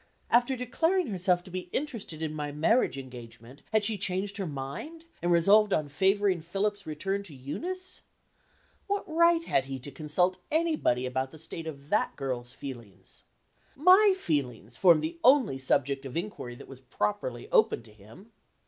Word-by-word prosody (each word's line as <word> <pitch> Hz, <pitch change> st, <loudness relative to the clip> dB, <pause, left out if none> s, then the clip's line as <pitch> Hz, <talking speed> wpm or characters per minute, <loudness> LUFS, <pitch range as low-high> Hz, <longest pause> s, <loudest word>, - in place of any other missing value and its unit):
After 245 Hz, +2 st, +4 dB
declaring 325 Hz, +9 st, +1 dB
herself 180 Hz, -2 st, +1 dB
to 185 Hz, -, -13 dB
be 180 Hz, 0 st, -5 dB
interested 230 Hz, -, -4 dB
in 155 Hz, -1 st, -2 dB
my 150 Hz, -1 st, -4 dB
marriage 160 Hz, -, +2 dB
engagement 125 Hz, 0 st, -11 dB
had 220 Hz, -1 st, +3 dB
she 210 Hz, -1 st, +2 dB
changed 195 Hz, +2 st, -1 dB
her 195 Hz, -3 st, -3 dB
mind, 150 Hz, -, -7 dB, 0.2 s
and 175 Hz, -, +1 dB
resolved 200 Hz, +5 st, +5 dB
on 150 Hz, -2 st, 0 dB
favoring 190 Hz, +3 st, +2 dB
Philip's 200 Hz, +4 st, -2 dB
return 195 Hz, +6 st, -2 dB
to 180 Hz, -8 st, -10 dB
Eunice? 365 Hz, -, -6 dB, 0.9 s
What 405 Hz, 0 st, -1 dB
right 335 Hz, +1 st, +4 dB
had 135 Hz, -, +1 dB
he 135 Hz, 0 st, -5 dB
to 130 Hz, +3 st, -8 dB
consult 180 Hz, +5 st, 0 dB
anybody 310 Hz, -, +1 dB
about 130 Hz, +1 st, -2 dB
the 160 Hz, -, -13 dB
state 160 Hz, +1 st, -5 dB
of 140 Hz, -2 st, -8 dB
that 210 Hz, -, +1 dB
girl's 125 Hz, -3 st, -4 dB
feelings? 115 Hz, -9 st, -11 dB, 0.5 s
My 375 Hz, +7 st, +6 dB
feelings 125 Hz, -, -2 dB
form 170 Hz, -2 st, +5 dB
the 165 Hz, +2 st, -4 dB
only 250 Hz, -, +5 dB
subject 135 Hz, +1 st, 0 dB
of 130 Hz, -, -6 dB
inquiry 170 Hz, -10 st, -5 dB
that -, -, -12 dB
was 135 Hz, -2 st, -10 dB
properly 130 Hz, -, -3 dB
open -, -, +3 dB
to 105 Hz, -, -17 dB
him. 110 Hz, -, -16 dB
170 Hz, 165 wpm, -28 LUFS, 135-215 Hz, 0.9 s, My